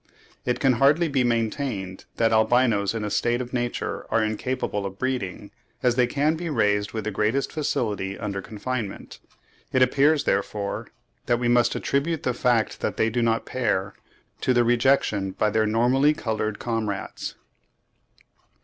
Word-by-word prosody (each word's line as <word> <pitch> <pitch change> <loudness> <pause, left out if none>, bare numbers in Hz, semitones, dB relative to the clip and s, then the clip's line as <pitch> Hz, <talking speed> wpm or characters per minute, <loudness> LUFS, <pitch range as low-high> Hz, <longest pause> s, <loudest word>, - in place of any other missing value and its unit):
It 125 0 0
can 135 -1 +4
hardly 150 +5 +5
be 135 -4 +1
maintained 115 -5 -2
that 115 -1 +2
albinos 110 -2 +3
in 110 - -2
a 105 - -3
state 120 +3 +1
of 125 0 -6
nature 120 -1 -3
are 115 - +2
incapable 110 -1 -2
of 95 0 -6
breeding, 125 -7 -3 0.3
as 125 - +4
they 125 0 +3
can 150 +5 +1
be 170 +1 -4
raised 105 -7 +1
with 110 -1 -4
the 110 - -2
greatest 110 +7 0
facility 105 -10 -2
under 100 -2 -4
confinement. 110 0 -5 0.5
It 130 - +4
appears, 145 +3 +3
therefore, 100 -1 -2 0.4
that 120 0 +3
we 120 0 -1
must 120 0 +3
attribute 150 +3 -1
the 125 - 0
fact 120 -2 +1
that - - -2
they 115 - +2
do 120 - 0
not 115 -1 +1
pair 100 -6 -1 0.5
to 130 - +1
their 120 - +5
rejection 120 -5 +2
by 105 +2 +1
their 110 +1 +2
normally 125 +7 +3
coloured 110 -4 -2
comrades. 110 -4 -3
120 Hz, 160 wpm, -25 LUFS, 105-130 Hz, 0.5 s, hardly